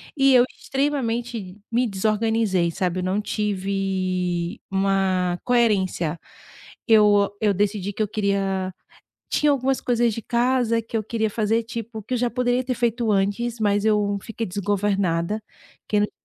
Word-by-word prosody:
e 275 -1 +4
eu 250 -1 +6
extremamente 240 -8 -2
me 240 +2 +1
desorganizei, 215 -3 +1
sabe. 180 +1 -1
Eu 180 - -2
não 185 +2 0
tive 190 -3 -2
uma 190 -2 +1
coerência, 195 -9 +1 0.7
eu 210 -2 +5
eu 210 -2 +3
decidi 205 0 -1
que 215 - 0
eu - - -1
queria 195 -3 -1 0.6
tinha 295 -1 +3
algumas 270 0 0
coisas 240 -2 +1
de 230 - -5
casa 240 -1 +1
que 225 0 -4
eu 215 - -2
queria 220 0 -1
fazer, 225 +2 0
tipo 230 -1 -6
que 250 +5 -2
eu - - 0
já 245 0 +1
poderia 250 +1 +1
ter 255 0 -1
feito 235 -1 0
antes, 205 +4 0
mas 205 -1 +1
eu 210 -2 +2
fiquei 225 +1 -5
desgovernada 200 -1 0 0.5
que 210 - +2
no - - +3
dia - - -21
210 Hz, 150 wpm, -23 LUFS, 195-235 Hz, 0.7 s, eu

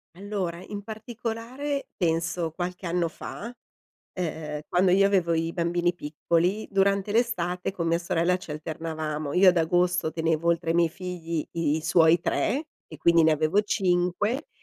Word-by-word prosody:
Allora, 185 -3 -4
in 205 -1 -6
particolare 235 +5 -5
penso 165 0 0
qualche 180 +2 -5
anno 170 0 0
fa, 230 +8 -8 0.6
uhm, 155 -4 -4
quando 180 +1 +3
io 195 +2 +5
avevo 185 -4 +2
i 165 0 -1
bambini 175 0 0
piccoli 170 +6 0
durante 195 0 +2
l'estate 185 -7 0
con 170 -3 -3
mia 165 0 +2
sorella 175 0 +1
ci 180 - -11
alternavamo. 155 -1 -4
Io 185 +1 +6
ad 180 - +5
agosto 175 0 +2
tenevo 160 0 0
oltre 170 0 +1
ai - - +2
miei 170 -1 +4
figli 170 -2 -4
i 160 -3 0
i - - -2
suoi 165 0 +4
3 270 - 0 0.2
e 155 - -10
quindi 170 +1 +5
ne 160 - +5
avevo 155 +6 +2
5 190 - 0
175 Hz, 155 wpm, -26 LUFS, 165-195 Hz, 0.6 s, Io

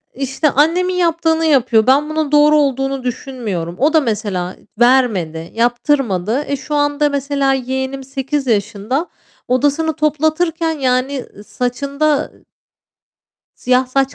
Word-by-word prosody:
işte, 270 +3 0
annemin 345 +6 +2
yaptığını 330 -2 +1
yapıyor. 255 -6 +3
Ben 290 +3 +3
bunun 310 -2 -2
doğru 300 +1 +5
olduğunu 270 -2 0
düşünmüyorum. 225 -9 -4
O 295 +5 +2
da 315 - +5
mesela 205 -6 -3 0.2
vermedi, 205 -11 +2
yaptırmadı. 240 -1 0
Eee, 280 - 0
şu 285 +3 -5
anda 290 0 +1
mesela 280 -1 0
yeğenim 265 +1 -3
8 270 +1 -3
yaşında, 220 - -1 0.4
odasını 290 +5 +1
toplatırken 315 +2 0
yani, 260 +1 0 0.2
ııı, 205 - -13
saçında 280 +6 -1 1.3
siyah 255 +1 +1
saç 270 +1 0
270 Hz, 120 wpm, -17 LUFS, 245-295 Hz, 1.3 s, doğru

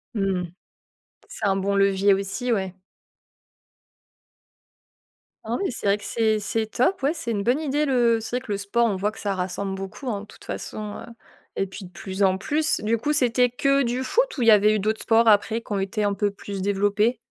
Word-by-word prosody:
Mmh. 190 -3 0 0.8
C'est 210 - -4
un 195 -1 +2
bon 200 +1 0
levier 195 0 +4
aussi, 200 +6 -2
ouais. 190 -3 -1 2.7
Ah, 225 +2 -2
oui, 390 - -1
c'est 235 - -7
vrai 200 - +3
que 205 - -14
c'est 220 -2 +1
c'est 220 +2 -1
top, 265 - 0
oui. 280 - +3
C'est 305 -8 -4
une 200 -2 -1
bonne 250 +7 +2
idée 300 0 0
le 240 -4 +3
c'est 235 +2 -3
vrai 255 - -7
que 210 - -4
le 200 - 0
sport, 215 +4 +1
on 200 - 0
voit 205 +3 -1
que 220 - -13
ça 200 -2 -2
rassemble 190 +2 -3
beaucoup, 195 +7 -6
hein, 200 -3 -2
de - - -10
toute - - -17
façon, 210 -1 -6
heu, - - -9 0.5
et 195 - -1
puis 190 +1 -9
de 180 - -13
plus 190 +3 -4
en 190 0 +3
plus. 305 +9 0
Du 225 +2 +1
coup, 290 +7 -1
c'était 250 -2 +3
que 275 +2 +2
du 245 +2 -1
foot 485 - 0
ou - - -2
il 230 - +2
y 225 - +9
avait 210 +1 +5
eu 215 - 0
d'autres 215 +2 -1
sports 230 0 +4
après 220 +2 +3
qui 225 - -15
ont 195 - 0
été 195 +2 -2
un 205 -1 +1
peu 205 0 0
plus 200 -1 -7
développés? 205 +4 +1
215 Hz, 220 wpm, -24 LUFS, 200-240 Hz, 2.7 s, y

